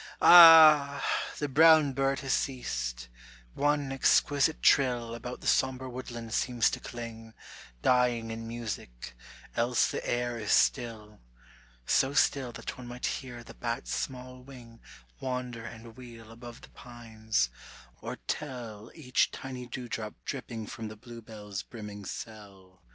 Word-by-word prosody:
Ah! 155 -4 +8 0.3
the 145 - -2
brown 155 0 +5
bird 135 +1 0
has 135 -2 -1
ceased: - - -3 0.5
one 145 -1 0
exquisite 145 +3 +2
trill 120 -4 +3
About 125 +1 -7
the - - -12
sombre 130 0 +1
woodland 120 -3 -7
seems 120 -3 +1
to - - -4
cling 115 -2 -9 0.5
Dying 120 -3 +2
in 115 0 -6
music, 110 - -7 0.4
else 120 0 +1
the - - -4
air 120 -1 -2
is 110 - -3
still, 110 -3 0 0.7
So 135 +1 +2
still 135 -4 +2
that - - -7
one 125 - -9
might 125 +1 -6
hear 120 -2 -5
the - - -13
bat's 115 -1 -4
small 125 -1 -5
wing 125 -3 -14 0.4
Wander 125 -3 -4
and 115 -1 -11
wheel 115 -3 -12
above 120 0 -11
the - - -14
pines, 110 - -3 0.5
or - - -5
tell 120 -7 -6
Each 130 -6 +1
tiny 130 -2 -8
dewdrop 115 -4 -6
dripping 115 -4 -6
from 115 0 -7
the 110 - -9
bluebell's 110 -4 -9
brimming 105 -3 -10
cell. 95 -4 -10
120 Hz, 135 wpm, -29 LUFS, 115-130 Hz, 0.7 s, Ah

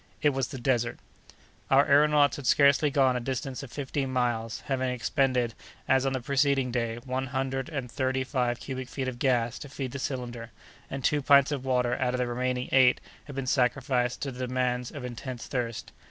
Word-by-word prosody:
It 150 - +5
was 135 -2 -1
the 135 - -7
Desert! 120 -2 0 0.7
Our 135 +2 +5
aëronauts 145 0 +4
had 140 -3 -5
scarcely 140 +1 +5
gone 135 -3 +3
a - - 0
distance 130 +1 -4
of 135 -4 -9
fifteen 135 -1 -3
miles, 120 -3 -1
having 130 -2 -1
expended, 125 -1 0 0.3
as 135 0 +3
on 135 - 0
the 130 - -1
preceding 135 -1 +1
day, 115 -2 -1
one 130 +1 -2
hundred 135 +1 -2
and 135 -6 -4
thirty 130 0 0
five 125 -3 -1
cubic 130 -2 -6
feet 130 -2 -3
of 125 -2 -5
gas 125 -3 +1
to 145 - -9
feed 135 -2 -5
the 140 - -5
cylinder, 120 -3 -4 0.4
and 135 -1 -5
two 150 -1 +2
pints 140 0 +5
of 135 -3 -3
water 125 -2 +1
out 125 -1 0
of - - -1
the 125 - 0
remaining 125 +1 -2
eight 130 -1 +5 0.3
had 140 - -9
been 135 -1 -3
sacrificed 125 -1 +1
to 140 - -3
the 125 0 -4
demands 125 -1 -1
of 145 -4 -7
intense 125 0 -6
thirst. 120 -3 -4
130 Hz, 195 wpm, -28 LUFS, 125-135 Hz, 0.7 s, It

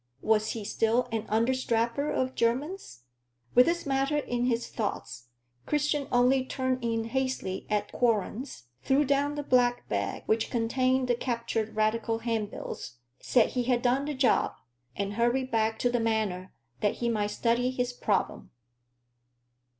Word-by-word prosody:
Was 215 -1 +2
he 220 -3 -6
still 230 +4 +1
an 225 -1 -2
understrapper 235 +3 +1
of 260 0 -1
Jermyn's? 255 - -2 0.5
With 250 - +6
this 340 0 0
matter 275 +1 +1
in 245 -4 -1
his 235 -1 0
thoughts, 120 - -4 0.4
Christian 295 -1 0
only 255 +2 +4
turned 260 -1 -2
in 225 -1 0
hastily 255 -5 -2
at 210 -1 -1
Quorlen's, 230 - -1 0.2
threw 275 - +2
down 285 +1 +1
the 290 - -3
black 245 -2 +2
bag 100 -1 -2
which 220 +1 +1
contained 255 +2 +1
the 245 - +3
captured 235 -3 -2
Radical 220 +1 +1
handbills, 225 - -4 0.2
said 240 -3 +3
he 250 -1 -1
had 245 -1 +1
done 255 +3 +2
the 295 0 -3
job, 260 -1 +2 0.4
and 200 0 -2
hurried 240 +4 +1
back 220 0 +1
to 245 - +1
the 240 - +1
Manor 215 -5 -1 0.3
that 205 - +1
he 235 - -2
might 215 -3 +1
study 235 +3 +1
his 250 -1 -2
problem. 210 -5 -1
240 Hz, 150 wpm, -28 LUFS, 220-260 Hz, 0.5 s, With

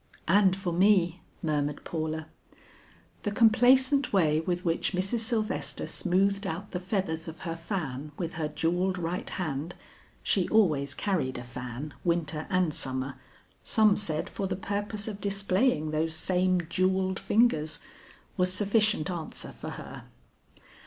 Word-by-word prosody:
"And 190 +2 +5
for 190 -3 -3
me," 180 -2 +3 0.2
murmured 150 -2 -1
Paula. 160 -1 -3 1.0
The 205 - -1
complacent 255 +5 +4
way 155 -6 +3
with 175 +2 -2
which 165 +4 0
Mrs. 190 +6 0
Sylvester 220 -1 -2
smoothed 195 +2 +1
out 190 +3 -5
the 180 - -2
feathers 180 -3 -2
of 160 0 -8
her 165 -3 -3
fan 155 -5 -4
with 170 -2 -3
her 160 -1 -2
jewelled 180 +4 0
right 175 +1 -3
hand, 160 -1 -3 0.5
she 190 -3 +2
always 150 -10 +3
carried 175 -10 -1
a 120 - -6
fan 125 +4 -6
winter 165 -3 -1
and 180 -4 +2
summer, 130 0 -2 0.5
some 215 -2 +4
said 160 -7 +1
for 195 - -3
the 185 - -2
purpose 205 +2 -3
of 210 -2 -5
displaying 200 - +1
those 160 +1 0
same 180 +2 +2
jewelled 185 +2 +1
fingers 160 -10 +2 0.6
was 180 0 +2
sufficient 205 -2 +2
answer 165 -3 -6
for - - -8
her. - - -8
180 Hz, 140 wpm, -28 LUFS, 160-200 Hz, 1.0 s, And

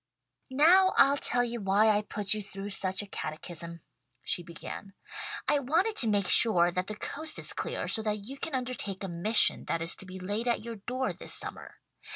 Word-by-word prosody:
"Now 345 +8 +4
I'll 275 +1 +5
tell 245 -3 +1
you 235 -1 -5
why 200 +3 +2
I 210 -1 +2
put 210 -1 -2
you 215 - -3
through 200 0 -8
such 190 0 -2
a - - -12
catechism," 170 0 -6 0.4
she - - -1
began. 175 +3 -10 0.5
"I 290 - +2
wanted 335 - -1
to 230 - +2
make 200 -3 0
sure 175 -6 +6
that 180 +2 -4
the 215 - -6
coast 310 +8 -3
is - - +3
clear, - - -5
so 220 - +4
that 210 -2 -4
you 275 +2 -8
can 320 -5 -5
undertake 250 -7 -5
a - - -4
mission 185 +6 +4
that 165 - -2
is 165 0 +4
to 190 - -3
be 185 0 -9
laid 205 +6 -4
at 235 -2 -1
your 230 -1 -7
door 255 +6 -4
this - - 0
summer. - - -2
210 Hz, 200 wpm, -28 LUFS, 190-250 Hz, 0.5 s, sure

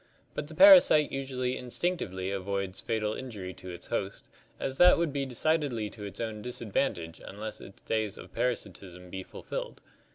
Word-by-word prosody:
But 145 - -4
the 160 - -10
para 190 +1 +11
site 150 -1 +3
usually 130 -2 -2
instinctively 120 - -2
avoids 100 -1 -3
fatal 110 -2 -1
injury 105 -8 -6
to 95 - -10
its 85 -1 -8
host, 100 +1 -4 0.3
as 135 0 -3
that 180 0 +8
would 165 -4 0
be 140 -1 -1
decidedly 130 -5 0
to 105 -2 -8
its 100 - -7
own 110 -2 -3
disadvantage 105 -7 -2
unless 110 +2 -7
its 100 - -13
days 110 -3 -1
of - - -12
parasitism 95 -7 -3
be 95 - -4
fulfilled. - - -6
110 Hz, 165 wpm, -29 LUFS, 95-135 Hz, 0.3 s, para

